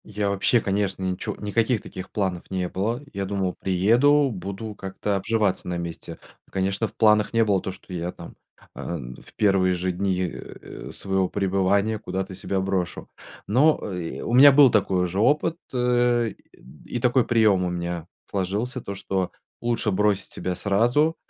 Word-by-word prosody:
Я 105 -1 -2
вообще, 100 +4 +2
конечно, 95 -1 -1
ничего 90 -1 -3
никаких 110 +2 0
таких 95 - -8
планов 95 -4 -2
не 90 -1 -1
было. 115 +8 -2
Я 100 -1 -2
думал, 95 -2 -1
приеду, 120 +10 +3
буду 100 +3 -6
как-то 100 +1 -3
обживаться 105 0 0
на 90 -1 -2
месте. 85 -1 -6 0.3
Ну, - - -27
конечно, 95 +3 0
в - - -16
планах 105 -1 +4
не 115 0 +4
было 100 -4 +2
то, 95 - -4
что 95 0 -12
я 90 0 -3
там, - - -11 0.4
э, - - -7 0.4
в - - -18
первые 95 -3 +3
же 90 +1 -1
дни, 95 0 -1
э, - - -10
своего 95 -1 -1
пребывания 100 +2 +1
куда-то 95 -1 -4
себя 95 +1 -2
брошу. 95 -2 -2 0.4
Но, 140 +9 +4 0.2
э, 85 -2 -5
у 115 - -3
меня 140 +3 +9
был 135 -2 +7
такой 95 -3 +2
уже 90 +2 -2
опыт, 150 +8 +2
э, 120 -2 +2 0.6
и 120 - -4
такой 125 +1 +3
прием 110 -5 +3
у 90 - 0
меня 85 -1 -4 0.2
сложился, 105 +7 -2
то, 100 - -6
что 95 -1 -2 0.3
лучше 120 -2 0
бросить 100 0 +1
себя 90 -1 -3
сразу, 120 - +2
100 Hz, 165 wpm, -24 LUFS, 95-115 Hz, 0.6 s, меня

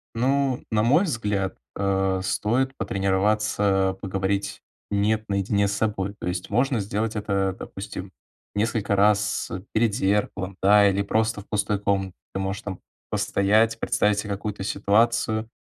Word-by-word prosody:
Ну, 130 +2 +1
на 105 -1 +2
мой 145 - +4
взгляд, 105 - -1 0.2
э, 95 -1 +1
стоит 130 +7 0
потренироваться 95 0 +1
поговорить 95 +1 -2 0.3
"нет" 105 +2 +1
наедине 100 +1 +1
с 100 - -1
собой. 100 -2 -1
То - - -5
есть 90 0 -3
можно 125 -1 +2
сделать 105 +3 -2
это, 100 -3 0
допустим, - - -7 0.4
несколько 105 -1 0
раз 105 +1 +2 0.2
перед 110 -2 +2
зеркалом, 100 -3 0
да, 100 +1 +6
или 100 0 +2
просто 110 +2 0
в 100 - -18
пустой 105 -1 0
комнате. 95 -2 0 0.2
Ты 95 - -2
можешь 95 +1 -3 0.5
постоять, 110 +3 +2
представить 105 0 +1
се 105 - -4
какую-то 100 0 -4
ситуацию, 110 +2 +1
105 Hz, 135 wpm, -24 LUFS, 100-110 Hz, 0.5 s, да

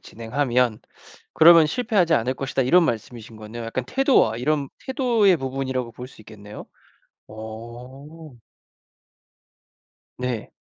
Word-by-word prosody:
진행하면 120 0 -1 0.5
그러면 165 0 +7
실패하지 195 -3 +1
않을 125 +3 0
것이다." 135 0 -2
이런 175 +8 +4
말씀이신 115 -3 -5
거네요. 110 +2 -9
약간 120 +2 -4
태도와 265 - +2
이런 140 +1 -1 0.2
태도의 240 - +2
부분이라고 130 -3 -4
볼 125 +2 -10
수 120 - -18
있겠네요. 105 -1 -12 0.6
어. 125 +8 -11 1.9
네. 125 -3 -4
130 Hz, 270 characters per minute, -22 LUFS, 115-160 Hz, 1.9 s, 그러면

